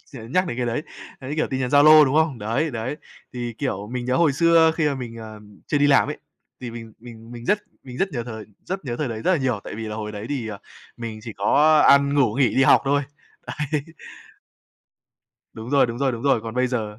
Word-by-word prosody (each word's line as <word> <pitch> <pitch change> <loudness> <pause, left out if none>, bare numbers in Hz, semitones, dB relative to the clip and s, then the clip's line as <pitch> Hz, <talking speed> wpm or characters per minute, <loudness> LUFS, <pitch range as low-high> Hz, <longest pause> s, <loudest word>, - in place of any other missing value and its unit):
nh 115 0 -9
nhắc 185 0 +2
đến 120 - -4
cái 125 - -2
đấy. 120 +5 -2 0.4
Đấy, 135 +2 -6
kiểu, 160 - +1
tin 130 0 -2
nhắn 125 -1 -2
Zalo, 155 +2 +7
đúng 135 +1 -1
không? 155 -6 +2
Đấy, 115 +9 -1
đấy. 120 +4 -4 0.4
Thì, 120 -2 -5
kiểu, 105 -8 -3
mình 125 -1 -3
nhớ 125 +1 0
hồi 160 -2 +3
xưa 165 +2 +4
khi 155 -3 +1
mà 140 - -2
mình, 120 -3 -7
ờm, 105 -2 -12
chưa 145 - 0
đi 145 - +3
làm 145 0 +4
ấy, 150 - -5 0.4
thì 125 -2 -6
mình 115 -1 -10
mình 115 0 -13
mình 120 -1 -9
rất 205 - +2 0.2
mình 125 -2 -10
rất 195 - +1
nhờ 120 -4 -3
thời 110 -3 -8 0.2
rất 190 -2 -5
nhớ 120 -3 -4
thời 150 -1 -2
đấy 110 -1 -6
rất 185 - +2
là - - +3
nhiều, 125 -6 -1
tại - - -7
vì 110 0 -6
là 105 - -5
hồi 105 -1 -5
đấy 105 +1 -7
thì, 130 -6 -3
ờ, 105 -2 -7 0.4
mình 115 -2 -6
chỉ 115 0 -7
có 150 +10 +3
ăn, 140 0 +5
ngủ, 130 -7 +2
nghỉ, 135 -1 +2
đi 135 - +4
học - - +5
thôi. 140 +1 +1 0.7
Đấy. 150 - +1 1.7
Đúng 115 +3 -9
rồi, 140 -2 +4
đúng 120 0 -6
rồi, 135 -1 +1
đúng 115 -1 -6
rồi. 135 -5 +2
Còn 115 0 -7
bây 125 0 +1
giờ 110 -4 -4
125 Hz, 245 wpm, -22 LUFS, 115-145 Hz, 1.7 s, Zalo